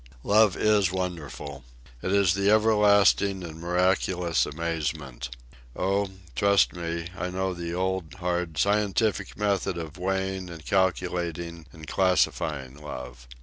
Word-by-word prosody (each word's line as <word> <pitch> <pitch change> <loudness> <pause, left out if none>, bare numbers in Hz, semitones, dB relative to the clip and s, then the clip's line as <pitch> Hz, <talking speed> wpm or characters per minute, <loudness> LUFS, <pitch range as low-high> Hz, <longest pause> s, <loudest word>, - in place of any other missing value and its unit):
Love 105 -2 +4
is 105 -4 +3
wonderful. 80 -7 -5 0.4
It 95 - -2
is 100 -4 +4
the 100 +1 +1
everlasting 105 -3 +4
and 80 -2 -8
miraculous 90 -1 +1
amazement. 75 -5 -3 0.5
Oh, 100 +1 0 0.3
trust 100 +6 +4
me, 85 -1 -4
I 90 -1 -3
know 95 +1 -1
the 85 -1 -5
old, 95 -3 -2
hard 90 -3 -2
scientific 105 +1 +1
method 100 -3 0
of 80 +1 -7
weighing 95 0 -2
and 85 -3 -10
calculating 85 -3 -1
and 80 +3 -11
classifying 75 -7 0
love. 65 -4 -8
90 Hz, 120 wpm, -26 LUFS, 85-100 Hz, 0.5 s, Love